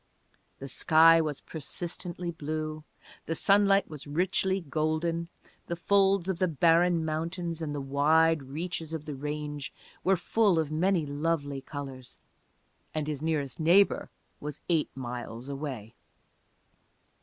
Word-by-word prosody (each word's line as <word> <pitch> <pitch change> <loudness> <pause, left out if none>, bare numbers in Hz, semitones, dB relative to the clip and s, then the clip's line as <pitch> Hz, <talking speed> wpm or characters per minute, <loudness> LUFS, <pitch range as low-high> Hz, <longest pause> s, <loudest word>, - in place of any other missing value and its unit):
The 135 - -7
sky 165 +4 +6
was 150 -3 -3
persistently 175 +3 -5
blue, 155 -1 -4 0.4
the 165 - -1
sunlight 200 +1 +4
was 150 -2 -9
richly 190 +5 +1
golden, 165 +1 -1 0.4
the 170 - -2
folds 195 0 +3
of 190 -3 -1
the 185 - +3
barren 170 +1 +3
mountains 165 +2 -3
and 150 -2 -3
the 145 - -3
wide 155 +3 +3
reaches 160 +4 -5
of 155 -2 -4
the 150 - -5
range 145 -1 -4 0.3
were 190 0 +3
full 200 +1 +2
of 155 -2 0
many 170 +1 +2
lovely 145 -1 -2
colors, 135 -3 -8 0.8
and 155 -1 -1
his 150 -2 -4
nearest 155 -4 -2
neighbor 175 +5 +4 0.3
was 150 -1 -6
eight 165 -3 +2
miles 120 0 -6
away. 135 -6 -5
160 Hz, 130 wpm, -29 LUFS, 145-170 Hz, 0.8 s, sky